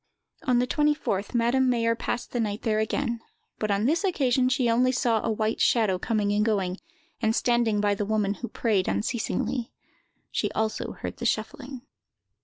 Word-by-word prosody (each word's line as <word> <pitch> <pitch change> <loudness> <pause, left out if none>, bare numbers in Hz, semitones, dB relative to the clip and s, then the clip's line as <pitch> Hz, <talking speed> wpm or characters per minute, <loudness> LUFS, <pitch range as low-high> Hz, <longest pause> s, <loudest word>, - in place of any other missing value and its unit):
On 250 -2 +3
the 245 - +3
24th, 275 -8 0
Madame 245 +3 +3
Mayer 230 -2 +2
passed 235 +1 -4
the 245 - -2
night 210 -2 -2
there 215 -1 +1
again; 235 +2 -1 0.4
but 215 - -1
on 200 +2 +1
this 320 - +2
occasion 260 -9 +2
she 260 -1 +1
only 245 +2 +3
saw 235 -3 +1
a - - -2
white 215 0 -1
shadow 210 -6 +3
coming 210 -1 0
and 210 +1 +2
going, 195 -4 0 0.4
and 220 0 +2
standing 235 -3 +2
by 205 0 +2
the 205 - -2
woman, 205 -1 0
who 240 - -3
prayed 210 -7 0
unceasingly. 235 +2 -1 0.6
She - - -1
also 220 0 -2
heard - - -6
the - - -1
shuffling. 270 -4 -3
230 Hz, 175 wpm, -26 LUFS, 210-250 Hz, 0.6 s, On